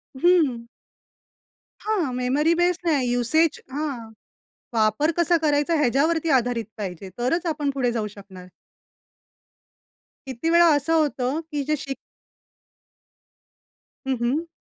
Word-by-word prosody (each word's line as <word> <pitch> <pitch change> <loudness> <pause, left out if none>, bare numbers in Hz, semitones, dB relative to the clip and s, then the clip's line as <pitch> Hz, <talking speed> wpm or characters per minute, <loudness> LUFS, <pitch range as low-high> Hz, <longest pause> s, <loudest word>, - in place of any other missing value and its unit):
हं. 270 -7 +2 1.2
हां, 380 -11 0
memory 265 +6 +1
base 355 0 +2
नाही 275 -7 +1
युसेज 300 +7 +2
हां 270 -6 -4 0.6
वापर 220 +8 +2
कसा 345 0 +3
करायचा? 295 +2 +2
ह्याच्यावरती 310 +5 +1
आधारित 240 -1 -2
पाहिजे 190 -3 -6
तरच 325 +9 0
आपण 300 -3 -1
पुढे 250 -3 0
जाऊ 220 -2 -2
शकणार. 190 -2 -12 1.8
किती 265 +5 -3
वेळा 340 +1 +6
असं 290 +3 0
होतं 290 -3 0
की 290 -1 -2
जे 305 +2 0
शिक 270 -1 -6 2.1
हं, 265 - +1
हं. 290 +8 0
280 Hz, 110 wpm, -23 LUFS, 240-325 Hz, 2.1 s, वेळा